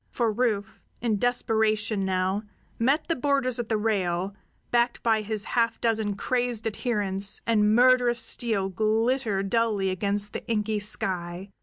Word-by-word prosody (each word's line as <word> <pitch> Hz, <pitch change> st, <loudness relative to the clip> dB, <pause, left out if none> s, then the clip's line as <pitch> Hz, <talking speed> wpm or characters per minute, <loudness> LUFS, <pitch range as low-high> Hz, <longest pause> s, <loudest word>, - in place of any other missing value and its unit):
For 235 Hz, -3 st, 0 dB
Rufe, 210 Hz, -4 st, -1 dB, 0.2 s
in 220 Hz, -3 st, -1 dB
desperation 220 Hz, -3 st, 0 dB
now, 190 Hz, +1 st, 0 dB, 0.4 s
met 275 Hz, +7 st, +1 dB
the 330 Hz, -, 0 dB
boarders 255 Hz, -3 st, 0 dB
at 235 Hz, -, -4 dB
the 220 Hz, -, +1 dB
rail, 195 Hz, -3 st, -1 dB, 0.4 s
backed 240 Hz, 0 st, +1 dB
by 225 Hz, -2 st, +2 dB
his 215 Hz, 0 st, -2 dB
half 230 Hz, -1 st, 0 dB
dozen 220 Hz, -3 st, 0 dB
crazed 245 Hz, -1 st, -1 dB
adherents, 205 Hz, -3 st, 0 dB
and 215 Hz, -2 st, +3 dB
murderous 245 Hz, -1 st, +4 dB
steel 220 Hz, -6 st, +1 dB
glittered 215 Hz, 0 st, 0 dB
dully 215 Hz, -5 st, +1 dB
against 200 Hz, +2 st, -2 dB
the -, -, -5 dB
inky 215 Hz, -2 st, -1 dB
sky. 185 Hz, -2 st, -2 dB
220 Hz, 140 wpm, -26 LUFS, 200-240 Hz, 0.4 s, murderous